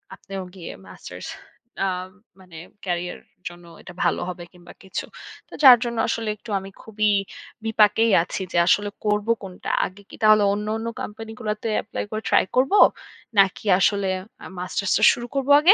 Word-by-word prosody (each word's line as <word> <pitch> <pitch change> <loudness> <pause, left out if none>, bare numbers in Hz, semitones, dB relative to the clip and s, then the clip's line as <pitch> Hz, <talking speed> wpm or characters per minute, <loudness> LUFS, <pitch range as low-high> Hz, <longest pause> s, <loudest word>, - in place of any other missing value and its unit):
আপনিও 195 -1 -7
গিয়ে 175 -3 -8 0.2
মাস্টার্স 90 - -10 0.6
আ - - +1 0.5
মানে 180 -3 -14 0.3
ক্যারিয়ার 180 -1 -3 0.3
জন্য 175 0 -10 0.2
এটা 180 - -11
ভালো - - +1
হবে 175 -1 -7
কিংবা 175 -1 -15
কিছু। 190 - -5 0.4
তো - - -16
যার 255 -3 +11
জন্য 235 -1 -4
আসলে 225 -1 -2
একটু 225 - -14
আমি 195 +1 -9
খুবই 215 -1 0 0.6
বিপাকেই 220 +1 +3
আছি 185 - -5
যে - - -1
আসলে 205 +2 +3 0.2
করব 210 0 +1 0.2
কোনটা। 185 -2 -7 0.2
আগে 195 +2 -9
কি - - -11
তাহলে 215 -1 +6
অন্য, 210 +1 -3
অন্য 225 +1 -5
কোম্পানি 220 +1 -7
গুলাতে 215 -1 -3
এপ্লাই 205 - -5
করে 215 0 -3
ট্রাই - - +4
করব? 260 +7 +2 0.7
নাকি 195 +2 +3
আসলে 200 0 +2 0.4
আ - - -8
মাস্টার্স 185 +2 -2
টা 215 - -1
শুরু 240 0 -6
করব 275 -1 -1
আগে। 345 +7 +7
210 Hz, 170 wpm, -23 LUFS, 185-225 Hz, 0.7 s, যার